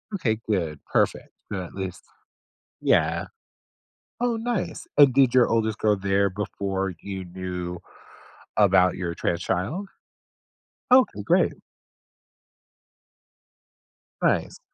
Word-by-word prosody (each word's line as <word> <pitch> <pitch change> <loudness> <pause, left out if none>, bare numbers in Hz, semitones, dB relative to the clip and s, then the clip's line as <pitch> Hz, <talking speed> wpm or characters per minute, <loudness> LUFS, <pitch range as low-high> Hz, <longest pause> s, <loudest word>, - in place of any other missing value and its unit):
Okay, 110 - 0
good, 80 -8 -1
perfect, - - 0 0.2
good 95 -3 -2
at 85 - -10
least 95 -2 -5 0.8
Yeah. 85 +3 +2 1.0
Oh, 245 -2 +1
nice, 225 -8 -3
and 140 -3 +7
did 135 -3 +5
your 125 -2 +5
oldest 110 -2 0
go 105 -1 +3
there 100 0 +1
before 95 -1 -3
you 95 -2 -6
knew 90 -1 -5 0.8
about 95 -3 +5
your 85 -2 -3
trans 85 0 -1
child? 150 - -2 1.0
Okay, 255 0 +5
great. - - +3 2.7
Nice. - - +1
100 Hz, 100 wpm, -25 LUFS, 90-120 Hz, 2.7 s, and